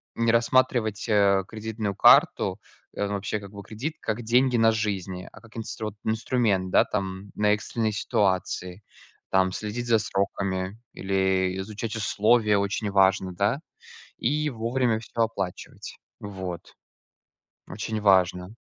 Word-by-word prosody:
не 115 Hz, 0 st, +2 dB
рассматривать, 115 Hz, -2 st, +1 dB
э, 100 Hz, -2 st, +4 dB
кредитную 110 Hz, -2 st, -4 dB
карту, -, -, +5 dB, 0.4 s
э, 100 Hz, -, -1 dB
ну 100 Hz, -, -3 dB
вообще, 100 Hz, +1 st, -2 dB
как 100 Hz, -1 st, -11 dB
бы 100 Hz, -1 st, -9 dB
кредит, 120 Hz, +11 st, -5 dB
как 110 Hz, +2 st, -3 dB
деньги 125 Hz, +2 st, +3 dB
на 115 Hz, 0 st, +5 dB
жизни, 95 Hz, -4 st, -3 dB
а -, -, -15 dB
как 115 Hz, 0 st, -15 dB
инстру 110 Hz, -1 st, -5 dB
вот 105 Hz, -, -7 dB
инструмент, 110 Hz, -4 st, 0 dB
да, -, -, +4 dB
там 95 Hz, -1 st, -4 dB
на 105 Hz, 0 st, +3 dB
экстренные 110 Hz, +1 st, -2 dB
ситуации. 95 Hz, -1 st, -1 dB, 0.5 s
Там 95 Hz, -1 st, +3 dB
следить 110 Hz, +5 st, -4 dB
за 115 Hz, -, +4 dB
сроками 95 Hz, -1 st, -2 dB, 0.2 s
или 95 Hz, -1 st, 0 dB
изучать 105 Hz, +3 st, -5 dB
условия 105 Hz, 0 st, +2 dB
очень 100 Hz, +1 st, -2 dB
важно, 95 Hz, -1 st, +3 dB
да? 100 Hz, +9 st, 0 dB, 0.6 s
И 150 Hz, +4 st, 0 dB
вовремя 120 Hz, -1 st, 0 dB
всё 115 Hz, +1 st, -4 dB
оплачивать. 100 Hz, -5 st, -4 dB, 0.2 s
Вот, 95 Hz, -4 st, -7 dB, 0.9 s
очень 110 Hz, +2 st, -4 dB
важно. 90 Hz, -2 st, +3 dB
105 Hz, 135 wpm, -26 LUFS, 95-115 Hz, 0.9 s, карту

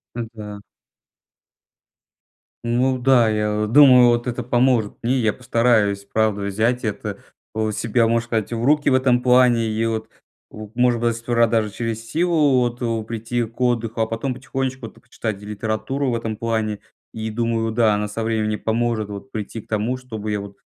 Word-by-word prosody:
М, 120 Hz, -1 st, -4 dB
да. 105 Hz, -2 st, -9 dB, 2.0 s
Ну 125 Hz, +2 st, +1 dB
да, 125 Hz, -2 st, +4 dB
я 105 Hz, -1 st, 0 dB
вот 105 Hz, +2 st, -2 dB
думаю 130 Hz, -4 st, +8 dB
вот 120 Hz, 0 st, +2 dB
это 125 Hz, -1 st, -3 dB
поможет 120 Hz, -2 st, +1 dB
мне. 125 Hz, +3 st, +1 dB
Я 110 Hz, -3 st, +1 dB
постараюсь 115 Hz, -5 st, +1 dB
правда 110 Hz, -2 st, +1 dB
взять 110 Hz, +5 st, 0 dB
это 105 Hz, -1 st, -4 dB, 0.3 s
вот, 110 Hz, -1 st, -1 dB
себя 115 Hz, +1 st, +1 dB
можно 115 Hz, 0 st, +1 dB
сказать 115 Hz, -1 st, -2 dB
в 115 Hz, 0 st, -3 dB
руки 145 Hz, +3 st, +3 dB
в -, -, +2 dB
этом 130 Hz, -1 st, +3 dB
плане 125 Hz, -2 st, +4 dB
и 110 Hz, +1 st, -1 dB
вот 110 Hz, -1 st, -2 dB, 0.4 s
в 110 Hz, -1 st, -10 dB
может 120 Hz, -2 st, +3 dB
быть 120 Hz, -, +2 dB
даже 115 Hz, 0 st, -3 dB
сперва 115 Hz, -2 st, +1 dB
через 115 Hz, +1 st, -5 dB
силу 155 Hz, -6 st, +2 dB
вот, 120 Hz, 0 st, -2 dB
э, 115 Hz, -2 st, -1 dB
прийти 115 Hz, +2 st, -3 dB
к 115 Hz, +2 st, -10 dB
отдыху. 115 Hz, -2 st, 0 dB
А 110 Hz, -, +2 dB
потом 115 Hz, +4 st, -3 dB
потихонечку 130 Hz, -1 st, -4 dB
это 115 Hz, -, -16 dB
почитать 110 Hz, -4 st, -5 dB
и -, -, -9 dB
литературу 110 Hz, +6 st, -2 dB
в -, -, 0 dB
этом 110 Hz, -2 st, -4 dB
плане, 110 Hz, -2 st, -2 dB, 0.3 s
и 110 Hz, 0 st, -4 dB
думаю, 115 Hz, 0 st, -1 dB
да, 110 Hz, -3 st, +3 dB
она 105 Hz, 0 st, -2 dB
со 110 Hz, +2 st, -4 dB
временем 110 Hz, -1 st, -1 dB
поможет 110 Hz, -2 st, -1 dB
вот 100 Hz, +6 st, -8 dB
прийти 110 Hz, +1 st, -5 dB
к -, -, -13 dB
тому, 110 Hz, +4 st, -1 dB
чтобы 110 Hz, -4 st, -6 dB
я 105 Hz, -, -1 dB
вот 100 Hz, 0 st, -9 dB
115 Hz, 185 wpm, -21 LUFS, 110-125 Hz, 2.0 s, думаю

